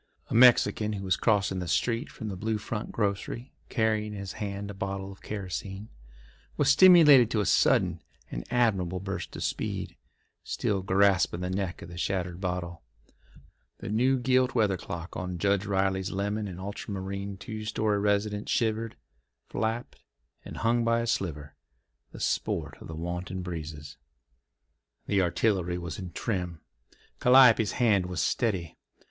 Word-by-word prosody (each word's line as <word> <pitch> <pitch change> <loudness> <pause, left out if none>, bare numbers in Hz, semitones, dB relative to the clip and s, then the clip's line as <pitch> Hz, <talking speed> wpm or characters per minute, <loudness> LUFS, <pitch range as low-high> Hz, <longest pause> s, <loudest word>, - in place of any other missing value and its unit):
A - - -1
Mexican 115 -3 +5
who 100 -1 -5
was 95 - +2
crossing 100 -4 +1
the 90 - -4
street 115 - 0
from 110 - -7
the 95 - -4
Blue 110 +4 -1
Front 105 +1 -5
grocery 105 +4 -3 0.2
carrying 110 -2 0
in 100 - -6
his 100 -1 -5
hand 100 -1 -5
a - - -8
bottle 95 0 -4
of 95 - -14
kerosene, 100 +1 -5 0.7
was - - +3
stimulated 150 - +8
to 110 - 0
a 105 - +1
sudden - - +3 0.3
and - - -4
admirable 95 -7 +1
burst 95 +1 -5
of - - -4
speed, - - -3 0.5
still 100 -2 -1
grasping 95 -2 +2
the 90 0 -2
neck 95 -2 -3
of - - -10
the 85 0 -8
shattered 90 -2 -2
bottle. 90 -2 -3 1.0
The - - -7
new 125 +5 +2
gilt 130 +1 +2
weather 105 -5 +3
cock 85 0 -7
on 90 -1 -4
Judge 100 +2 +1
Riley's 95 -1 0
lemon 105 +2 -2
and 90 -2 -7
ultramarine 100 0 -5
two 110 +2 -7
story 105 -1 0
residence 105 0 0
shivered, 115 -1 0 0.5
flapped, 115 +2 -3 0.4
and - - -9
hung 115 +1 +2
by 115 0 +2
a - - -2
splinter, 75 -10 -2 0.6
the - - -10
sport - - -1
of - - -9
the 80 - -7
wanton 90 +3 -4
breezes. 75 -5 -7 1.1
The 100 -2 +2
artillery 90 0 +1
was 85 -4 -6
in 95 - -6
trim. 90 -5 -3 0.6
Calliope's 125 -4 +6
hand 105 -7 +2
was 90 -2 -4
steady. 90 - -1
100 Hz, 155 wpm, -28 LUFS, 90-110 Hz, 1.1 s, stimulated